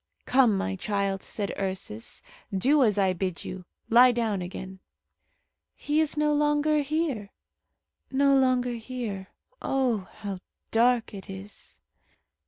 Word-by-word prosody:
"Come, 245 -6 +4
my 95 - -2
child," 200 - -1
said 205 -2 -3
Ursus, 185 - -4 0.3
"do 265 +10 +3
as 215 -5 +3
I 190 -2 +3
bid 185 -1 -3
you. 185 -1 -7 0.2
Lie 245 +2 +7
down 220 -5 0
again." 190 +1 -7 1.0
"He 295 +2 +1
is 310 -1 0
no 300 0 +2
longer 295 +1 +2
here, 285 -8 -2 0.8
no 275 +1 +3
longer 255 -2 +2
here. 225 -5 -5 0.3
Oh! 245 -8 0
how 200 -3 -6 0.3
dark 235 0 +3
it 195 -1 -9
is!" 195 +2 -10
225 Hz, 125 wpm, -27 LUFS, 195-270 Hz, 1.0 s, Lie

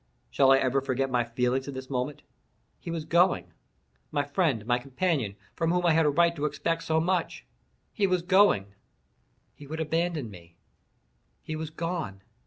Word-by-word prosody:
Shall 135 -1 +4
I 135 - +7
ever 135 +1 +1
forget 135 0 -1
my 120 -1 +2
feelings 125 +3 -1
at 140 - -6
this 130 0 -6
moment? 130 +2 -3 0.6
He - - -8
was 165 -2 -3
going—my 70 - -1
friend, 145 - 0
my 120 +1 +2
companion, 135 - -1 0.2
from 165 -1 0
whom 180 +1 +1
I 170 - +5
had 160 -1 +4
a - - +5
right 170 +3 +3
to 145 - -1
expect 165 +2 -1
so 160 -1 +1
much—he 185 +3 -3
was 180 -2 +1
going—he 145 - -1
would 160 +2 -5
abandon 160 -5 -1
me—he 85 - -14
was 155 0 -4
gone! 160 - -4
145 Hz, 155 wpm, -28 LUFS, 120-165 Hz, 0.6 s, I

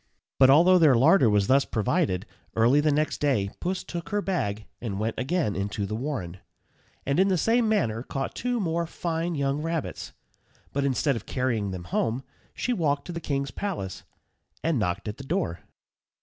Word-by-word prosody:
But 130 -1 +7
although 175 +6 +6
their 150 -6 +6
larder 135 - +5
was 105 -1 +3
thus 135 +5 +4
provided, 110 - 0 0.3
early 120 +6 +4
the 150 0 +2
next 150 +1 0
day 110 -10 +1
Puss 180 +1 -2
took 170 -1 -6
her 205 - 0
bag 110 - -2 0.2
and 100 -5 -3
went 110 +1 -1
again 135 - 0
into 100 +1 -2
the 100 - -5
warren, 110 - -4 0.7
and 140 +4 +1
in 190 - +5
the 190 -2 +2
same 225 +6 +2
manner 115 - +1
caught 135 +2 -4
two 245 0 -1
more 170 -3 -1
fine 170 0 -2
young 140 0 0
rabbits. 165 -1 -3 0.6
But 140 0 0
instead 140 +1 +1
of 115 - -7
carrying 120 -6 -1
them 90 -2 -5
home 115 +8 -1 0.3
she 250 - -1
walked 145 -8 0
to - - -6
the 170 - -5
king's 140 -3 -2
palace 170 - -4 0.6
and 160 -5 +1
knocked 100 +1 -2
at 105 - -4
the 140 - -8
door. 135 - -2
140 Hz, 180 wpm, -26 LUFS, 110-170 Hz, 0.7 s, But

